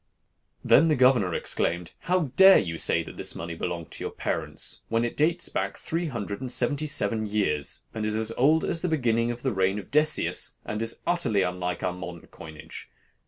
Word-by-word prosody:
Then 160 - +5
the 155 - +3
governor 125 -9 +3
exclaimed, 85 0 -1
'How 175 -6 0
dare 190 0 +8
you 85 -3 -2
say - - +2
that - - -11
this - - -4
money 85 +1 -5
belonged 85 0 -5
to - - -8
your - - -2
parents - - -3
when 115 +1 +1
it 120 - -4
dates 165 +3 +1
back - - -3
three 165 +1 -3
hundred 105 -5 -5
and 130 - -4
seventy 140 +5 0
seven 115 -7 +1
years, 100 -9 -1
and 110 - -4
is 105 0 0
as 110 0 +1
old 155 +6 +3
as 165 - 0
the 180 - -1
beginning 120 -6 +1
of 120 0 -5
the 130 -3 0
reign 95 +1 +1
of 105 +1 -8
Decius, 150 +2 +2
and 105 +1 -4
it - - 0
is 115 - -3
utterly 170 - +1
unlike 90 0 -3
our 90 - 0
modern 90 -2 -8
coinage? 80 -2 -11
115 Hz, 205 wpm, -26 LUFS, 90-150 Hz, -, dare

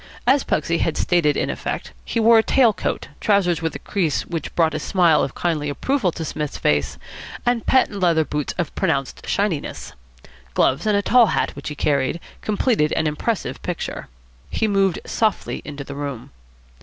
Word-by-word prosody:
As 265 +2 +4
Pugsy 165 +2 0
had 165 - 0
stated 165 -5 +2
in - - 0
effect, - - -4
he 230 - -2
wore 225 0 +6
a - - +6
tail 235 -1 +4
coat, - - -3
trousers 180 -6 +2
with 160 -1 -2
a - - -2
crease 175 -7 -1
which 165 -2 -5
brought 160 -2 +3
a 155 - -2
smile 170 -2 +3
of 135 - -2
kindly 155 -4 -1
approval 215 - 0
to 160 - -5
Psmith's 150 -1 -4
face, 75 -3 0 0.5
and 245 -1 0
patent 255 -6 +3
leather 165 -4 +3
boots 150 -1 -3
of 170 -5 -2
pronounced 140 -8 -1
shininess. 195 -8 -2 0.6
Gloves 135 +11 +2
and 210 -1 +3
a 200 - 0
tall 240 0 +5
hat, - - -1
which 140 - -6
he 150 - -6
carried, 140 +2 0 0.2
completed 205 -7 +1
an 160 - 0
impressive 165 +8 -2
picture. 175 -2 -4 0.4
He 220 - 0
moved 195 -3 +2
softly 220 -2 -1
into 145 -1 -6
the 140 - -8
room. 140 -4 -6
170 Hz, 180 wpm, -22 LUFS, 150-210 Hz, 0.6 s, wore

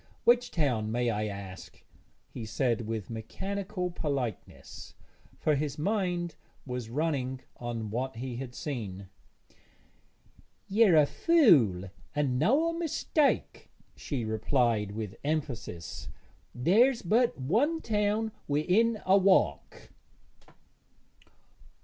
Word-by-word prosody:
Which 245 +1 +4
town, 125 - 0
may 120 0 +1
I 105 0 -1
ask?' 100 -3 -9 0.4
he 120 - -8
said, 115 0 -1
with 110 -1 -4
mechanical 185 - -4
politeness, 140 -9 -5 0.4
for 155 - +1
his 145 0 -2
mind 175 -1 -1 0.3
was 125 -3 -5
running 130 -2 -1 0.2
on 115 -3 -4
what 130 +3 -3
he 120 +1 -5
had 125 -1 -7
seen. 100 -9 -5 1.6
'Yer 205 -3 +5
a 150 -2 +7
fool 140 - +4 0.2
and 135 -4 +1
noä 300 - +3
mistake,' 320 -2 0 0.3
she 130 -6 -4
replied 110 -1 +1
with 105 -3 -5
emphasis. 135 - -4 0.5
'There's 230 - +3
but 230 - +2
one 235 - +1
town 215 -2 0 0.2
wi'in 195 +10 +2
a 195 +2 +5
walk.' 190 0 +1
140 Hz, 100 wpm, -29 LUFS, -, 1.6 s, a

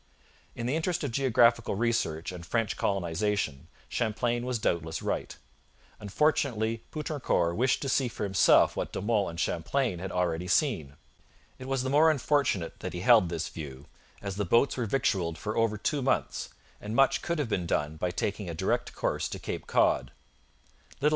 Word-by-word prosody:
In 115 - -4
the 130 +5 0
interest 170 +1 -1
of 140 - -2
geographical 115 -3 +3
research 100 -8 -1
and 90 -1 -8
French 115 +4 -1
colonization 90 -4 -1 0.2
Champlain 120 +2 -1
was 125 -1 0
doubtless 80 -6 -1
right. - - -3 0.6
Unfortunately, 115 -1 0
Poutrincourt 145 - -1
wished 130 +6 +1
to - - -2
see 130 -1 +2
for 115 - -5
himself 100 -2 +4
what - - -3
De - - -4
Monts 105 -1 +1
and 85 0 -7
Champlain 95 - -1
had 95 +1 -5
already 90 -1 -1
seen. 90 - +1 0.6
It 130 - -8
was 135 -1 0
the 130 - -2
more 155 +3 +6
unfortunate 140 - 0
that - - -5
he 90 - -4
held 110 -4 +5
this 85 -1 -3
view, 70 -3 -8 0.4
as 100 -1 -4
the 105 - 0
boats 115 +8 +3
were 120 -3 -2
victualled 95 -9 0
for 105 0 -4
over 115 -2 +1
two 140 +7 -1
months, 130 - -1 0.3
and 105 +2 -5
much 135 +1 +4
could 170 0 -2
have 145 -6 -1
been 90 -5 -1
done 75 -1 -1
by 90 +3 -1
taking 100 +1 -3
a 85 - -4
direct - - -1
course - - -1
to - - -5
Cape - - -6
Cod. - - +2
110 Hz, 175 wpm, -29 LUFS, 90-130 Hz, 0.6 s, more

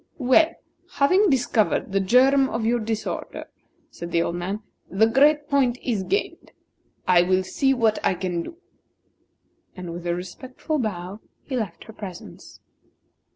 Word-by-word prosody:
"Well, 260 +4 +4 0.5
having 370 +8 +3
discovered 240 -8 +1
the 195 - +2
germ 265 +7 +4
of 225 0 -2
your 240 +1 +2
disorder," 220 -1 -4 0.5
said 170 0 -8
the 170 0 +2
old 170 - -2
man, 195 +5 -4 0.3
"the 195 +5 +3
great 290 +5 +3
point 270 -4 +2
is 225 -6 -1
gained. 400 - -3 0.5
I 180 -1 +6
will 185 +1 +2
see 270 +8 +1
what 225 -3 +1
I 190 - +2
can 175 -1 -2
do." 330 - -9 1.2
And 180 -2 -7
with 175 0 -7
a 170 - 0
respectful 255 - -5
bow 195 -3 -4 0.2
he 265 - -5
left 215 -8 -4
her 220 - -13
presence. 190 -4 -10
220 Hz, 150 wpm, -24 LUFS, 185-265 Hz, 1.2 s, I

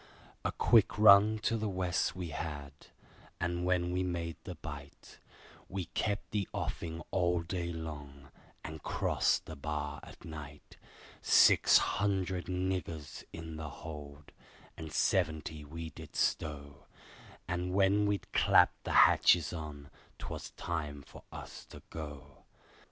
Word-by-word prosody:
A - - 0
quick 115 -4 +4
run 105 +1 +8
to 115 - +2
the 110 -1 -1
West 90 -2 0
we 90 -2 -4
had, 75 -2 -5 0.7
and 85 0 -1
when 90 -1 +1
we 90 +1 0
made 85 -2 -3
the 90 - -6
Bight, 75 -3 -10 0.5
We 95 -2 -3
kept 105 0 -1
the 100 -3 -1
offing 85 0 -4
all 90 -2 +1
day 85 0 -3
long, 70 -4 -8 0.3
and 80 0 -7
crossed - - +1
the 80 - -8
bar 75 0 -4
at - - -13
night. 75 -2 -10 0.4
Six - - +6
hundred 95 -2 0
niggers 90 -6 -3
in 80 -1 -7
the 80 -1 -5
hold, 75 -1 -9 0.4
and 80 -1 -8
seventy 80 0 0
we 80 +2 -7
did - - -12
stow, 70 -1 -2 0.6
And 90 0 -2
when 100 +2 +3
we'd 100 -3 -2
clapped - - +4
the - - -2
hatches 85 -1 +4
on, 75 -4 -7 0.3
'twas - - -6
time 75 -4 -4
for - - -13
us - - -9
to - - -13
go. 75 -4 -9
80 Hz, 135 wpm, -32 LUFS, 75-90 Hz, 0.7 s, run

